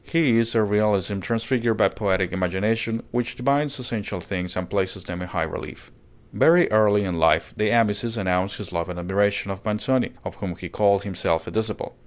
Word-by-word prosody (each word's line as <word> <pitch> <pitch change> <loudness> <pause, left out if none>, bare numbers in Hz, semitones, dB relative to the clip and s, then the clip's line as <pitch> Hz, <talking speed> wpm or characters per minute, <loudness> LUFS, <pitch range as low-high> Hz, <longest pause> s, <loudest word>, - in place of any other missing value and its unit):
His 125 -9 +2
is 115 - -4
a 110 - +4
realism 105 -1 +1
transfigured 115 +2 0
by - - +4
poetic 95 -4 -1
imagination, 105 +5 -1
which 120 +1 -2
divines 140 +3 0
essential 115 -6 -4
things 90 0 -4
and 90 -1 -3
places 95 -1 -2
them 90 -1 -6
in 90 - -5
high 85 -2 -2
relief. 80 - -7 0.4
Very 175 -2 +5
early 105 -1 +4
in 90 -4 -2
life 80 - +3
De 105 0 +1
Amicis 115 0 +1
announced 95 0 0
his 100 -4 -8
love 85 0 -2
and 90 - -5
admiration 100 +3 0
of 95 0 -7
Manzoni, 115 +4 0
of - - -5
whom 95 -4 -4
he 90 0 -8
called 100 -1 +2
himself 90 -4 -1
a - - -7
disciple. 110 -1 -3
100 Hz, 190 wpm, -24 LUFS, 95-115 Hz, 0.4 s, Very